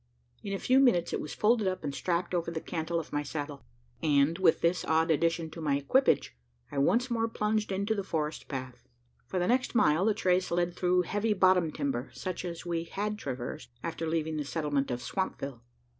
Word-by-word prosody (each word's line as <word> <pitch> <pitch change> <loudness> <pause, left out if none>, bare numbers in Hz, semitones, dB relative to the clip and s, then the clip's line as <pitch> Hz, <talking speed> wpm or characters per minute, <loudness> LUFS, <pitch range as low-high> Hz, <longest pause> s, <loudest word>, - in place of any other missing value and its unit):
In 200 - -5
a 195 - 0
few 255 +6 +3
minutes, 195 -11 +3
it - - -1
was 150 - -6
folded 215 -1 +3
up, 185 -2 -2
and 145 -2 -3
strapped 175 +4 -1
over 170 -1 0
the 165 -1 -3
cantle 165 +1 -2
of 160 - -8
my 145 - +1
saddle; 145 -1 -5 0.4
and, 145 +1 +3
with 175 -4 +4
this 170 +2 +2
odd 160 +1 +2
addition 165 +1 +1
to 165 - -8
my 145 -3 +1
equipage, 145 - +2 0.4
I 140 - -2
once 240 - +2
more 225 -1 +1
plunged 215 -1 -1
into 200 +3 0
the 200 -2 -2
forest 155 -4 -3
path. 130 -2 -6 0.4
For 190 - -3
the 180 - +2
next 250 0 +1
mile, 160 -3 +4
the 220 -2 +3
trace 185 -2 +2
led 175 0 0
through 180 0 +2
heavy 210 +4 0
bottom 185 -4 +4
timber, 140 -4 -2
such 185 -1 -4
as 170 -1 -6
we 170 -1 -2
had 210 +4 -3
traversed, 130 -6 -5
after 165 0 -3
leaving 160 -1 -1
the 150 - -1
settlement 145 -2 -1
of 125 0 -3
Swampville. 140 -10 -3
170 Hz, 205 wpm, -30 LUFS, 150-190 Hz, 0.4 s, with